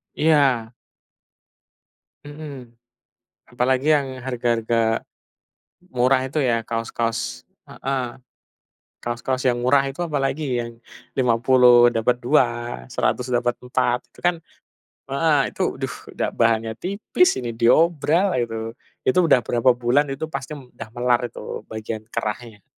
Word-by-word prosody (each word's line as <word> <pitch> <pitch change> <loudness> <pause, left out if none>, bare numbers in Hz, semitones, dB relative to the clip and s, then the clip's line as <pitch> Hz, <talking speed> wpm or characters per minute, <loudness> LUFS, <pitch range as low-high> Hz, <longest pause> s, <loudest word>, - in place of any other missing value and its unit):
Iya. 135 -7 +3 1.5
Hmm. 145 -5 -9 0.7
Apalagi 130 +4 0
yang 130 -2 -4
harga-harga 115 -2 0 0.9
murah 130 +1 +2
itu 135 +4 -3
ya, 120 -5 +1
kaos-kaos 115 0 -3 0.2
heeh. 135 -2 -3 0.9
Kaos-kaos 125 +2 -2
yang 120 -1 +1
murah 140 +3 +5
itu 140 +6 -4
apalagi 140 -4 -1
yang 115 0 -5 0.4
Rp50.000 120 0 +5
dapet 120 +1 +1
2, 120 - 0
Rp100.000 125 0 -1
dapet 120 0 +1
4. 125 0 0
Itu - - -19
kan 175 -1 +2 0.8
heeh 145 0 +2
itu - - -6
aduh, - - -4 0.2
udah - - -1
bahannya 115 -1 +1
tipis, 200 - +1
ini 120 -2 -4
diobral 160 - +3
itu. 115 -1 -3 0.3
Itu 170 +6 +3
udah 130 - +6
berapa 120 +2 +3
bulan 125 +4 +2
itu 160 +3 -6
pasti 135 +3 -5
udah 125 -5 -10
melar 120 0 +1
itu 120 - -7
bagian 110 0 -6
kerahnya. 110 -2 -5
125 Hz, 115 wpm, -22 LUFS, 115-140 Hz, 1.5 s, udah